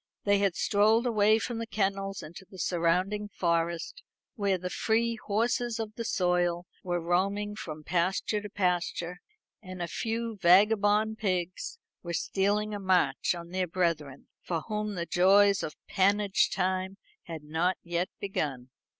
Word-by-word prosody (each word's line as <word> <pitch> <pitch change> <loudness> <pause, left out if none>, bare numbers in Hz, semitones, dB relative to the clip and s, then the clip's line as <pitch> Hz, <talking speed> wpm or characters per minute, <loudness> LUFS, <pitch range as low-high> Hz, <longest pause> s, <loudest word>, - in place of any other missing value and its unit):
They 200 -1 +3
had 200 -3 +1
strolled 215 +5 +3
away 215 -2 +4
from 230 0 -3
the 230 - -4
kennels 195 -2 -1
into 170 +5 -10
the 190 - -13
surrounding 185 +4 0
forest, 170 - -1 0.3
where 200 -6 0
the 180 0 -5
free 230 +1 +1
horses 235 +2 0
of 220 -1 -4
the 230 - -5
soil 175 -3 +1 0.2
were 175 -1 -1
roaming 200 +5 0
from 155 -7 -7
pasture 185 +5 0
to 210 - -7
pasture, 180 -2 -1 0.4
and 185 0 -9
a 175 - -2
few 225 +4 -3
vagabond 205 +4 +4
pigs 185 - -2 0.2
were 170 -1 -5
stealing 205 +4 0
a 205 - -3
march 180 -6 +2
on 170 0 -8
their 185 0 -1
brethren, 165 -6 -2
for 165 -3 -2
whom 210 0 -3
the 170 -1 -2
joys 195 +3 +4
of 150 - -5
pannage 200 +1 +2
time 185 0 -1 0.3
had 160 -3 -7
not 165 +4 0
yet 175 +1 -1
begun. 135 -10 -3
190 Hz, 150 wpm, -29 LUFS, 175-210 Hz, 0.4 s, away